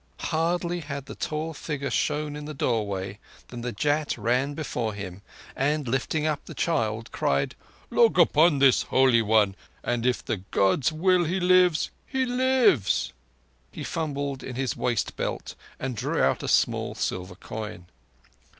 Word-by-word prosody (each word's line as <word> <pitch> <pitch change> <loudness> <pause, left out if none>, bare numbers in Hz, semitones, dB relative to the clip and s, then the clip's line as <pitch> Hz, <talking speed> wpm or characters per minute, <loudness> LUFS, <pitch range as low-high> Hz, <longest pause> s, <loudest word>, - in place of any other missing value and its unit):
Hardly 170 +2 0
had 140 -3 -6
the - - -8
tall 155 +1 -3
figure 145 -2 -4
shown 150 -1 0
in 150 0 -7
the 150 0 -6
doorway 100 -5 -1 0.3
than 120 -1 -7
the 120 +1 -3
Jat 145 +7 0
ran 125 +6 0
before 120 -8 -3
him, 100 -2 -7 0.3
and, 145 +1 0
lifting 135 +5 0
up 150 -2 -1
the - - -9
child, 115 -9 -1
cried: 70 0 0 0.4
"Look 230 -5 +4
upon 165 -2 +5
this, 135 -2 +5
Holy 130 -3 +4
One; 105 -3 +3 0.3
and 120 -1 -1
if 125 0 0
the 110 - -1
Gods 95 - +1
will, 175 +2 +3
he 180 +4 0
lives—he 185 - +2
lives!" 245 - +2 0.6
He - - -7
fumbled 140 -4 -3
in 125 - -7
his 130 -1 -1
waist 120 -5 -1
belt - - -4 0.3
and 130 -2 -3
drew - - -1
out - - +2
a - - -4
small - - +1
silver 90 0 -3
coin. 105 -1 -7
140 Hz, 150 wpm, -26 LUFS, 115-160 Hz, 0.6 s, upon